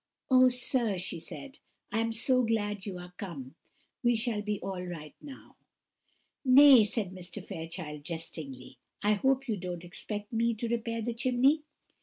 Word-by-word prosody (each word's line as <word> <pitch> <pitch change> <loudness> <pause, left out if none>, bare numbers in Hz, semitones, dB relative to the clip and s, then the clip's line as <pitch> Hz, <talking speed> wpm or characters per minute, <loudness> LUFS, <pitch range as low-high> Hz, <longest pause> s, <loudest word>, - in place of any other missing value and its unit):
"Oh, 255 0 +7
sir," 245 -4 +1
she 175 -1 -3
said, 270 - -8 0.3
"I 220 - 0
am 230 0 0
so 255 +3 +2
glad 210 -3 -1
you 190 -3 -4
are 180 0 -10
come! 150 - -7 0.5
We 240 -1 +3
shall 225 -2 -1
be 210 -1 -2
all 190 -2 -4
right 165 -4 -7
now." 280 -2 -12 0.9
"Nay," 265 -3 +8
said 210 -3 -2
Mr. 180 -2 -7
Fairchild, 160 -2 -6
jestingly, 155 -5 -6 0.2
"I 210 +1 +4
hope 265 +5 +1
you 220 -3 -1
don't 180 -2 -5
expect 205 +4 -6
me 230 0 +1
to 230 +2 -3
repair 230 -1 -2
the 240 +1 -2
chimney." 255 +5 +3
210 Hz, 160 wpm, -30 LUFS, 180-245 Hz, 0.9 s, Nay